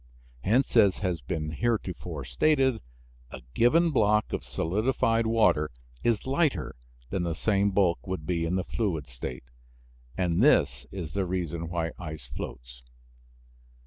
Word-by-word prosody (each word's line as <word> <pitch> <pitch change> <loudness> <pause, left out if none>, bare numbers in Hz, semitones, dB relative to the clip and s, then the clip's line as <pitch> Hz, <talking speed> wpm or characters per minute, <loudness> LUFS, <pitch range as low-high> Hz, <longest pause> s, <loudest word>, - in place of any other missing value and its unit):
Hence, 125 +7 +2
as 100 -5 +5
has 90 -6 -2
been 75 +5 -3
heretofore 90 - -2
stated, 135 - +2 0.5
a 65 -1 -10
given 165 - +4
block 105 -5 +2
of - - -2
solidified 115 +5 0
water 105 -10 +3 0.3
is 115 -3 +1
lighter 135 - 0 0.4
than 95 - -1
the 85 -2 -1
same 100 +2 +2
bulk 95 -3 +1
would 95 -5 -4
be 85 -1 -1
in 85 +2 0
the 95 - 0
fluid 90 - -2
state, 60 -1 -7 0.7
and 90 0 +1
this 70 - +3
is 85 -6 -6
the 100 -2 -1
reason 85 -2 -3
why 85 -1 -2
ice 80 -5 -7
floats. - - -8
90 Hz, 140 wpm, -28 LUFS, 80-110 Hz, 0.7 s, as